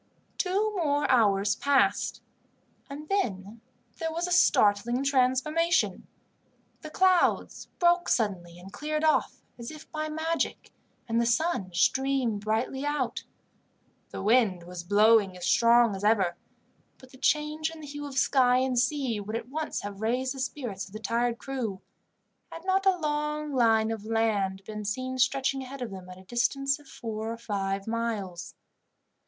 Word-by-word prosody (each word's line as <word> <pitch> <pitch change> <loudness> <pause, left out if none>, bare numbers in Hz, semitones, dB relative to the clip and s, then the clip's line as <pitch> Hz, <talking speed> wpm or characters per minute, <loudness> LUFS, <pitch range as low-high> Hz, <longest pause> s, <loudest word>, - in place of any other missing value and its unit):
Two 405 +3 0
more 295 -5 +1
hours 205 -4 +3
passed, 280 +4 +1 0.7
and 295 +2 -8
then 220 - -2 0.4
there 325 -1 -2
was 335 +2 -2
a - - -5
startling 240 - +3
transformation. 280 +5 +1 0.7
The 310 - -8
clouds 370 +2 +2
broke 350 0 +3
suddenly 180 -7 -1
and 185 +2 -13
cleared 305 +1 -3
off, 310 -1 +1 0.2
as 235 - -6
if 310 0 -12
by 310 0 -3
magic, 320 +2 -2 0.4
and 230 0 +1
the 235 - +1
sun 235 - 0
streamed 260 0 +1
brightly 225 +5 -1
out. 290 -4 -2 0.8
The - - -6
wind 210 -5 +3
was 175 0 -8
blowing 205 0 +4
as 180 - -6
strong 235 -2 +4
as 195 - -7
ever, 200 -5 +2 0.6
but 260 -1 -17
the 260 - -15
change 300 +3 0
in 325 0 -11
the - - -8
hue 290 0 -6
of 275 -1 -8
sky 250 -3 +4
and 255 -1 +1
sea 255 -3 0
would 210 +2 -5
at 235 +1 -5
once 310 +3 -3
have 200 0 -7
raised 250 +4 0
the 270 - -9
spirits 245 -8 -4
of 195 - -17
the 215 - -6
tired 235 +1 0
crew, 240 -9 -4 0.7
had 330 +2 -9
not 385 +1 +1
a 380 -1 +4
long 300 -1 -2
line 225 -3 +3
of 220 -2 -5
land 210 -4 0
been 210 +1 -7
seen 255 +5 -3
stretching 270 +1 +1
ahead 260 0 -7
of 230 - -6
them 185 -1 -9
at 180 - -10
a 185 - -14
distance 275 +6 0
of 295 - -19
four 220 -1 -5
or 230 - -5
five 195 -3 -3
miles. 215 -6 -4
245 Hz, 160 wpm, -28 LUFS, 210-295 Hz, 0.8 s, blowing